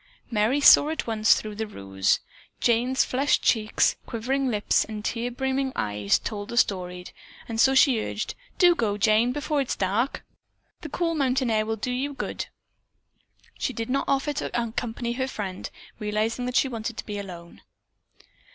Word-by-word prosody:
Merry 220 +5 +2 0.2
at 310 +2 -2
once 220 -2 0
saw - - +8
through 215 -1 -7
the 220 +1 -4
ruse. 95 - 0 0.4
Jane's 245 +2 +2
flushed 275 +3 +1
cheeks, 215 -2 +2
quivering 265 +4 -1
lips 210 -3 +2
and 215 -1 -7
tear 235 +1 -1
brimmed 265 +1 -1
eyes 105 -1 +1
told 205 -2 -5
the 235 - -5
story, 180 -5 0 0.4
and 225 -1 0
so 265 +2 +5
she 265 -4 +5
urged, 215 - -4 0.2
"Do 355 -2 +6
go, 215 -10 -1
Jane, 215 +3 +3
before 295 +1 -1
it 270 - -3
is - - 0
dark. 205 +8 -1 0.6
The 310 - -7
cool 335 +3 -1
mountain 260 -4 +1
air 215 -1 +1
will 225 - -1
do 220 +4 -3
you 275 +3 -2
good." - - -4 1.1
She 260 - -1
did 230 +1 -4
not 275 - +1
offer 275 +2 +1
to - - -3
accompany 235 0 -3
her 260 +1 -2
friend, 195 -7 -5 0.3
realizing 215 +4 -1
that 250 - -4
she 275 - +4
wanted 230 -2 -5
to - - -5
be 205 -1 -4
alone. 175 -4 -10
230 Hz, 170 wpm, -25 LUFS, 210-265 Hz, 1.1 s, saw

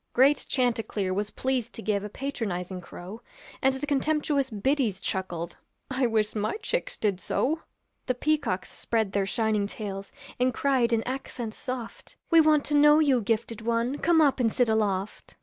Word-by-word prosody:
Great 270 +3 +4
chanticleer 225 -6 0
was 205 +2 -1
pleased 255 -1 -2
to - - -5
give 205 -2 0
A 210 - -5
patronizing 195 -8 -4
crow, 185 +6 -9 0.4
And 265 0 +3
the 265 +2 -3
contemptuous 290 -1 +1
biddies 225 -2 0
chuckled, 175 -3 -4 0.3
'I 260 -1 +2
wish 215 -2 +1
my 215 - -1
chicks 450 +3 -2
did 200 -4 0
so.' 315 - 0 0.5
The 255 - +1
peacocks 285 -10 0
spread 220 -4 -1
their 195 -1 0
shining 215 -1 +1
tails, 200 -2 -6 0.3
And 250 -1 +2
cried 260 -4 +2
in 225 -1 +2
accents 250 -3 -5
soft, 250 -3 -6 0.2
'We 330 -1 +8
want 305 -2 +4
to 295 - -3
know 295 +1 +7
you, 280 -6 +3
gifted 225 +1 -1
one, 235 +4 0
Come 330 -1 +4
up 280 -3 +3
and 230 -3 +2
sit 245 0 +2
aloft.' 210 -2 -1
235 Hz, 165 wpm, -27 LUFS, 210-275 Hz, 0.5 s, We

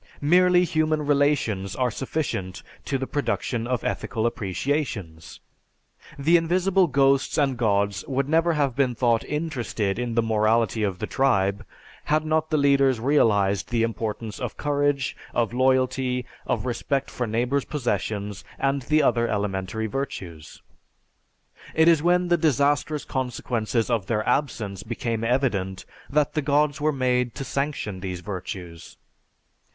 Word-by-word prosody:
Merely 180 +4 +4
human 155 -2 0
relations 140 -10 +1
are 125 -2 0
sufficient 95 - -3 0.2
to 135 - -1
the 135 - -3
production 125 -4 -2
of 125 -2 -1
ethical 115 -3 -2
appreciations. 100 - -3 0.8
The 160 +5 +4
invisible 180 +3 +2
ghosts 135 -1 +2
and 140 -3 +2
Gods 100 -4 0
would 135 0 -1
never 165 +2 +3
have 140 -5 0
been 130 -3 +1
thought 115 -1 +2
interested 120 -10 -2
in 120 -2 -2
the 115 - +3
morality 110 0 +2
of 100 -4 -1
the - - -3
tribe, 100 -7 +1 0.4
had 155 +1 +1
not 155 0 0
the 155 - +1
leaders 140 -3 +3
realized 105 -7 +2
the 115 -2 +1
importance 110 -1 -3
of 125 -4 -5
courage, 145 -2 0 0.2
of 120 -1 +1
loyalty, 130 0 +1 0.2
of 115 -2 -1
respect 130 +3 -2
for 125 - -3
neighbors' 125 +5 0
possessions, 105 -6 -3
and 135 0 0
the 150 +4 +2
other 120 -1 +2
elementary 100 0 -2
virtues. 100 - -6 1.1
It 160 +1 +5
is 165 -3 +5
when 175 +1 +2
the 175 - +4
disastrous 145 0 +1
consequences 120 -3 -2
of 110 -5 0
their 110 -2 -1
absence 120 -7 -1
became 115 0 -3
evident 105 -7 0 0.2
that 150 0 +1
the 155 - 0
Gods 145 0 +1
were 155 +1 +2
made 125 -3 0
to - - -4
sanction 140 -9 -3
these 90 -2 -5
virtues. 90 -3 -7
125 Hz, 140 wpm, -24 LUFS, 110-145 Hz, 1.1 s, It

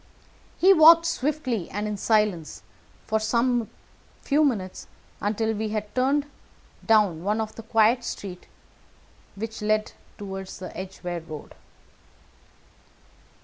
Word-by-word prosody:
He 380 +2 +6
walked 330 0 +8
swiftly 275 - -2
and 205 +2 -3
in 210 - -2
silence 205 -6 0 0.4
for 220 0 0
some 235 +1 +1 0.5
few 295 +2 +3
minutes, 200 -10 -2 0.3
until 220 +2 0
we 215 0 -3
had 210 -1 -4
turned 275 +3 +1 0.6
down 205 -7 +3
one 210 +3 0
of 220 -1 -3
the - - -9
quiet 225 +2 +3
streets 185 -5 -7 0.9
which 220 +2 -6
led 215 0 +1 0.3
toward 195 -2 -6
the 185 -1 -9
Edgeware 180 -1 -5
Road. 155 -2 -10
215 Hz, 115 wpm, -25 LUFS, 195-245 Hz, 0.9 s, walked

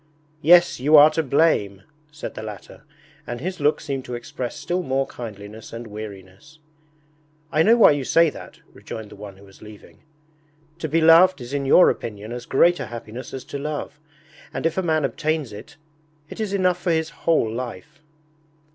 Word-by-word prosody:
'Yes, 175 0 +5
you 150 +4 +5
are 150 +1 +8
to 160 - 0
blame,' 135 -10 +1 0.3
said 150 - -7
the - - -7
latter, 110 +6 -10 0.4
and 120 0 -5
his 180 +6 -5
look 150 +1 +2
seemed 135 -2 -4
to 125 - -5
express 120 +1 -6
still 180 +1 -2
more 135 -4 -1
kindliness 105 -3 -10
and 115 +1 -7
weariness. 105 +5 -11 0.9
'I 155 - +2
know 225 +7 +5
why 225 - +7
you 145 -2 -1
say 165 +4 +3
that,' - - -12
rejoined 110 -2 -9
the - - -11
one 100 -1 -11
who 100 - -17
was 95 -1 -19
leaving. 105 -1 -14 0.8
'To 160 - -4
be 165 +3 +2
loved 165 +2 +6
is 125 +2 -9
in 140 -1 -2
your 180 - +6
opinion 105 -1 -7
as 120 0 -7
great 175 +6 +3
a - - -5
happiness 120 +1 -8
as 130 - -7
to 140 - -7
love, 150 0 -5 0.5
and - - -5
if 165 - +1
a 190 - 0
man 160 -4 +1
obtains 155 -7 -2
it, 145 +8 -12 0.5
it - - -9
is 215 -3 -2
enough 185 -2 +1
for 180 - -2
his 160 -1 -1
whole 155 -10 0
life.' 120 -6 -7
140 Hz, 185 wpm, -22 LUFS, 110-160 Hz, 0.9 s, are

